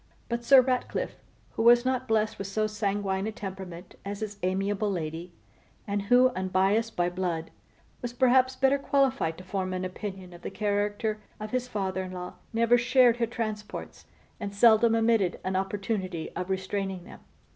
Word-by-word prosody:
But 235 0 -2
Sir 265 +2 +8
Ratcliffe, 255 0 -2 0.3
who - - -3
was 240 +1 +6
not 255 0 0
blessed 220 -1 +1
with 195 - -4
so 215 +2 0
sanguine 205 -2 -1
a - - -2
temperament 190 -3 -8
as 200 +1 -5
his 205 -2 -5
amiable 195 +3 0
lady, 170 -1 -4 0.5
and 205 -1 -1
who, 245 +5 +5
unbiassed 195 +4 +1
by 175 0 +2
blood, 175 -2 -3 0.5
was 245 - -3
perhaps 260 +1 +3
better 270 +1 +3
qualified 270 - +1
to 185 - -10
form 185 0 -3
an 185 0 -2
opinion 185 -1 -6
of 175 - -12
the - - -5
character 210 +1 -1 0.2
of 215 0 -6
his 255 -1 -1
father 190 -5 -2
in 185 0 -6
law, 180 0 -6 0.2
never 230 +1 +4
shared 245 0 +4
her 235 -1 +1
transports, 215 -3 -5 0.3
and 200 0 -5
seldom 225 +1 +6
omitted 225 -5 +2
an 185 0 -2
opportunity 190 -3 -2
of 180 +1 -4
restraining 190 -1 -2
them. - - -12
205 Hz, 165 wpm, -28 LUFS, 190-235 Hz, 0.5 s, Sir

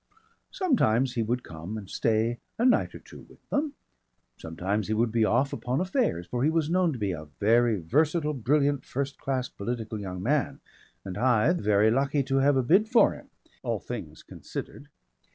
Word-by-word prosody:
Sometimes 135 - +1
he 120 - -1
would 120 +3 -1
come 85 +7 -7
and 100 -3 -8
stay 115 +3 0 0.2
a 235 - +1
night 255 - +3
or - - -9
so - - -12
with - - -19
them, 290 0 -1 0.6
sometimes 95 +6 -3
he 110 - 0
would 115 +1 +1
be 115 0 +2
off 135 +5 +1
upon 125 +2 -2
affairs, 185 - 0
for 120 +7 -2
he 150 - +4
was 160 -1 0
known 180 -1 +3
to 135 - -5
be 100 -4 -1
a 80 -3 -6
very 115 0 +3
versatile, 150 - +1
brilliant, 140 +2 +1
first 140 +1 -4
class 130 -2 -2
political 110 0 -5
young 90 -2 -6
man 145 +5 0 0.5
and 95 -2 -6
Hythe 125 +7 +2
very 105 +1 +3
lucky 140 +3 +1
to 135 0 0
have 135 +1 +3
a 130 - +2
bid 195 - +3
for 240 -1 +5
him, - - -13 0.3
all - - -1
things - - -7
considered. - - -8
125 Hz, 185 wpm, -27 LUFS, 110-150 Hz, 0.6 s, for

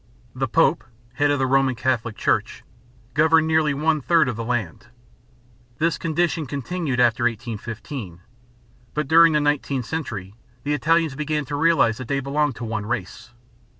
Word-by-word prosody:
The 130 +1 -2
Pope, 155 +4 +2 0.3
head 145 +2 +1
of 145 - +2
the 135 - +1
Roman 135 0 +2
Catholic 115 -2 -1
Church, - - -1 0.5
governed 160 +1 +4
nearly 155 -2 +2
one 155 +1 +1
third 165 +1 +3
of 125 - -2
the 115 - -4
land. 115 -3 -3 0.9
This 165 0 0
condition 165 -1 -1
continued 140 0 -3
after 120 -1 +3
1815. 115 - -5 0.8
But 150 -2 -1
during 165 +1 +6
the 150 - +3
nineteenth 145 -3 0
century 110 - -5 0.3
the 145 - -1
Italians 160 +2 +2
began 150 +1 -2
to 145 +2 -4
realize 145 -7 +3
that 130 - -6
they 140 +1 0
belonged 140 0 -1
to - - -7
one 110 -2 -4
race. 115 -4 -5
140 Hz, 155 wpm, -23 LUFS, 120-155 Hz, 0.9 s, during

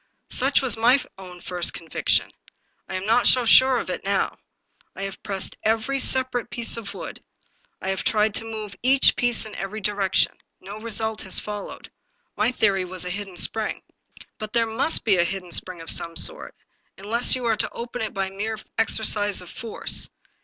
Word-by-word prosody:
" - - -49
Such 270 +2 +2
was 260 - +2
my 240 +5 +4 0.2
own 180 -2 -11
first 175 -2 0
conviction. 165 -2 -1 0.6
I 190 - -5
am 185 +1 -4
not 230 +3 +3
so 250 -2 +5
sure 260 +3 +6
of 185 - -3
it - - -5
now. 195 0 -1 0.6
I 195 - -6
have 195 -1 -6
pressed 195 -2 -4
every 225 +5 0
separate 260 -3 +1
piece 235 -1 +1
of 225 -3 -7
wood; - - -8 0.6
I 190 - -5
have 190 -1 -2
tried 215 -1 +1
to 225 - +1
move 215 -2 -6
each 265 +2 +5
piece 240 -2 0
in 215 - -9
every 195 +2 -5
direction. 200 -2 0 0.2
No 200 +3 -9
result 220 -1 -3
has 190 - +1
followed. 210 -1 -8 0.4
My 210 +3 +2
theory 200 -6 +1
was 180 -1 -5
a 180 - -4
hidden 195 -1 -6
spring." 220 +3 -1 0.3
" - - -20
But 215 0 -7
there 230 -1 +2
must 225 +8 +1
be 205 -4 +3
a 170 - +4
hidden 180 0 -5
spring 180 0 -1
of 165 - -1
some 170 0 0
sort, - - +2 0.4
un 195 - -12
less 235 +5 +6
you 255 -1 -5
are 225 -2 +1
to - - 0
open 240 +1 -6
it 220 - -3
by 195 -1 -3
a - - -16
mere 220 +2 -3 0.2
exercise 210 -2 +2
of 180 -2 -8
force. 225 -2 0
215 Hz, 195 wpm, -23 LUFS, 195-230 Hz, 0.6 s, sure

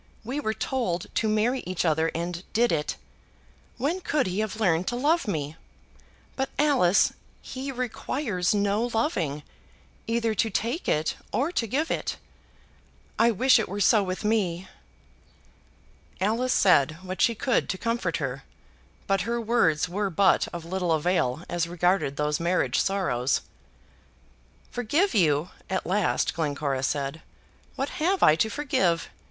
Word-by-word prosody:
We 255 +6 -3
were 220 -6 -2
told 220 -8 -2
to 220 - +1
marry 220 +5 +1
each 185 -1 -2
other 160 0 +2
and 170 +1 -3
did 235 +2 +3
it. 150 -2 -1 0.8
When 315 +9 -1
could 295 -5 0
he 185 +2 -2
have 215 0 -2
learned 180 -4 +2
to 240 - -1
love 300 +4 +1
me? 155 -4 -3 0.8
But, 265 0 -1
Alice, 260 -11 +4 0.3
he 265 +1 -6
requires 240 -5 -2
no 205 +3 +1
loving, 165 - -1 0.6
either 230 -1 0
to 225 +1 +1
take 235 - -2
it 155 +1 0
or 285 +6 0
to 230 -10 -1
give 295 +9 -1
it. - - -2 1.0
I 230 - +5
wish 255 +4 +4
it 220 - -2
were 200 +2 -4
so 210 +2 +5
with 185 +1 -4
me." 190 -5 0 1.5
Alice 225 +7 +1
said 155 -5 +4
what 185 0 -5
she 230 - +3
could 255 +3 0
to 185 - -1
comfort 190 -7 -1
her, 135 -2 -4 0.6
but 195 -1 +1
her 235 +1 -1
words 215 -10 +2
were 200 +3 -1
but 190 +2 +3
of 170 -1 -7
little 180 -1 0
avail 160 -3 0
as 170 -1 -1
regarded 175 -4 +1
those 150 0 0
marriage 175 +2 +1
sorrows. 140 -10 0 1.3
"Forgive 290 - +1
you!" 155 -4 +2 0.2
at 190 - -1
last 195 +2 +1
Glencora 145 -4 -1
said. 140 +3 -2 0.5
"What 270 +2 -2
have 375 +4 +2
I 155 - +7
to 220 - +2
forgive? 205 - 0
195 Hz, 145 wpm, -26 LUFS, 170-235 Hz, 1.5 s, I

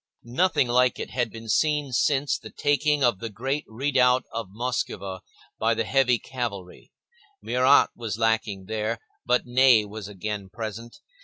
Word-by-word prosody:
Nothing 130 +3 +1
like 125 +1 +3
it - - -6
had 120 -2 -1
been 115 +1 -10
seen 150 +4 +1
since 135 +4 +1
the - - -10
taking 145 0 +1
of 120 -6 +2
the 115 - -5
great 135 +8 -3
redoubt 125 +1 +2
of 115 -2 -4
the 95 - -21
Muskowa 100 -6 -3 0.4
by - - +2
the - - 0
heavy 130 -3 +3
cavalry; 110 -7 -6 0.5
Murat 130 +3 +4
was 110 -3 -4
lacking 110 -4 0
here, 110 +1 -2 0.3
but 125 0 +2
Ney 125 -3 +5
was 105 -1 -8
again 105 0 -5
present. 110 +2 -7
120 Hz, 155 wpm, -25 LUFS, 110-130 Hz, 0.5 s, Ney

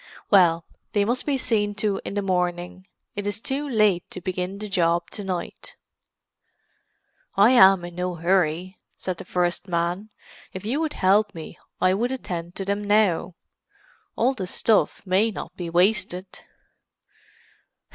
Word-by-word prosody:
Well, 170 -4 +5 0.3
they 205 -1 +2
must 245 +6 -1
be 280 -2 +2
seen 205 -5 0
to 200 -1 -1
in - - -5
the 205 - 0
morning; 180 0 -2 0.3
it 205 0 -3
is 205 0 -2
too 280 +5 -3
late 210 -7 +3
to - - -7
begin 185 +1 -3
the 210 +1 -6
job 170 -3 +1
to 205 - -5
night." 185 -3 -5 1.6
"I 205 +5 +7
am 190 -7 +6
in 175 - -8
no 180 0 -3
hurry," 180 +1 0 0.2
said 185 -2 -4
the - - -9
first 175 +1 -1
man. 175 +4 -1 0.4
"If 185 +1 -7
you 255 +7 -1
would 315 -2 -1
help 200 +2 +2
me 160 -1 -8 0.2
I 185 0 +3
would 235 +6 0
attend 175 -9 -5
to 195 - -4
them 200 +1 -1
now. 200 -4 +2 0.8
All 250 +4 +2
the 190 -8 -5
stuff 210 +2 +1
may 195 +4 +2
not 220 - -7
be 175 -2 -5
wasted." 185 +1 +1
190 Hz, 155 wpm, -24 LUFS, 180-210 Hz, 1.6 s, I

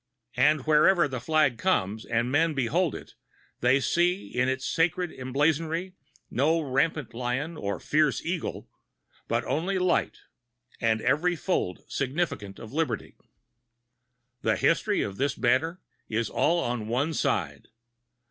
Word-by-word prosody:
And 150 +3 +4
wherever 155 +2 +5
the 130 -2 -4
flag 150 -2 +2
comes, 110 - 0
and 120 +2 0
men 160 +2 +2
behold 150 +7 +1
it, - - -10 0.5
they 125 +3 +4
see 175 +6 +1
in 125 +1 +1
its 130 0 -2
sacred 170 +1 0
emblazonry 160 +7 -1 0.4
no 155 +6 +2
rampant 145 0 0
lion 125 +7 -2
and 100 -9 -4
fierce 155 -1 +2
eagle, 170 0 -3 0.6
but - - 0
only 185 +6 -1
light, 185 -1 +1 0.6
and 110 -2 +1
every 150 +9 +2
fold 155 - -2
significant 135 - -2
of 115 +2 -10
liberty. 160 +1 -2 1.3
The - - +2
history - - +2
of 100 -1 -5
this 140 0 0
banner 145 +9 +1 0.3
is 110 0 -1
all 170 +3 +2
on 120 -3 -3
one 135 +8 0
side. 85 - -1
145 Hz, 130 wpm, -27 LUFS, 125-165 Hz, 1.3 s, wherever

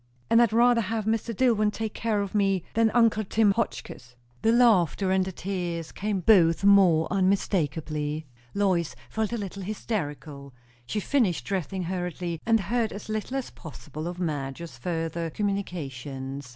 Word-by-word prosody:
"And 230 - +6
I'd 235 -3 +3
rather 235 +1 +4
have 220 0 -2
Mr. 225 +1 0
Dillwyn 225 -2 +2
take 220 0 -4
care 215 -3 0
of 200 - -7
me 195 -4 +1
than 225 0 +3
uncle 225 -1 +3
Tim 215 +1 +3
Hotchkiss." 125 - -4 0.3
The 225 - +3
laughter 200 - +3
and 190 0 +3
the 190 - -4
tears 175 -3 -4
came 200 -2 -2
both 175 -4 +4
more 190 -5 +5
unmistakeably. 160 -6 0 0.3
Lois 185 -5 +1 0.2
felt 220 -1 -1
a 235 - -1
little 200 -2 -6
hysterical. 150 - -5 0.3
She 210 - -1
finished 225 - +1
dressing 190 -1 -2
hurriedly, 175 -2 -4
and 225 -2 +4
heard 225 +3 0
as 205 +2 -8
little 215 +5 -2
as 265 - -4
possible 155 +1 -8
of 175 0 -5
Madge's 150 -2 -4
further 165 +4 -3
communications. 140 -9 -4
190 Hz, 150 wpm, -26 LUFS, 165-215 Hz, 0.3 s, And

